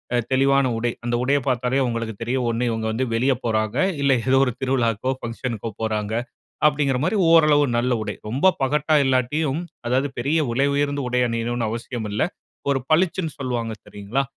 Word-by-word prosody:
அ - - +3
தெளிவான 135 +1 +3
உடை 120 +1 0 0.2
அந்த 120 0 0
உடைய 140 +2 +3
பார்த்தாலே 125 +2 +1
உங்களுக்கு 115 -1 -3
தெரியும் 125 +1 -1
ஒண்ணு 115 +2 -1
இவங்க 110 -1 -2
வந்து 130 +4 -1
வெளிய 130 +3 +2
போறாங்க, 110 -2 0 0.2
இல்ல 140 -1 +3 0.2
ஏதோ 135 +1 +4
ஒரு 125 - 0
திருவிழாக்கோ, 130 -2 0
பங்ஷனுக்கோ 115 -1 -4
போறாங்க. 110 -1 -2 0.5
அப்படிங்கிற 145 -3 +2
மாதிரி 185 +5 +1
ஓரளவு 155 -3 +6
நல்ல 125 +1 +1
உடை. 105 -1 -3 0.2
ரொம்ப 145 +11 +3
பகட்டா 150 +3 +2
இல்லாட்டியும் 135 +3 +1 0.3
அதாவது 130 +3 +1
பெரிய 140 +7 +1
விலை 135 +4 +2
உயர்ந்த 145 0 0
உடை 125 0 0
அணியணும்னு 115 0 -2
அவசியம் 115 -1 -4
இல்ல. 105 - -2 0.5
ஒரு 135 -1 +2
பளிச்சுன்னு 165 -1 +1
சொல்லுவாங்க 120 -4 -2
சரிங்களா? 105 +7 -3
125 Hz, 165 wpm, -22 LUFS, 115-140 Hz, 0.5 s, ஓரளவு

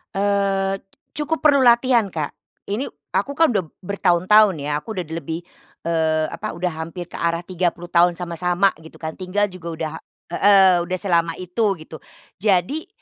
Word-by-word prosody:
Eee, 195 -1 +1 0.4
cukup 300 +2 -1
perlu 285 -3 +4
latihan, 235 -3 +4
Kak. 155 -3 -4 0.3
Ini 210 +6 -2 0.3
aku 280 - +1
kan 315 0 +3
udah 200 -5 +1 0.2
bertahun-tahun 195 +1 +3
ya. 145 +1 -2
Aku 225 - -7
udah 185 -5 -3
di 160 - -8
lebih, 165 0 -4 0.5
eee, 160 -1 +1
apa, 215 +6 -5
udah 175 +1 -2
hampir 170 +2 -7
ke - - -12
arah 170 0 0
30 175 -1 -2
tahun 175 0 +3
sama-sama 180 +2 +1
gitu 160 - -14
kan, 160 -1 -5
tinggal 195 +2 0
juga 180 -3 -10
udah 160 -1 -4 0.4
heeh, 190 -1 +6
udah 185 +2 -3
selama 170 -4 +1
itu 185 +5 -2 0.2
gitu. 155 0 -10 0.4
Jadi 205 - +1
185 Hz, 160 wpm, -21 LUFS, 170-205 Hz, 0.5 s, heeh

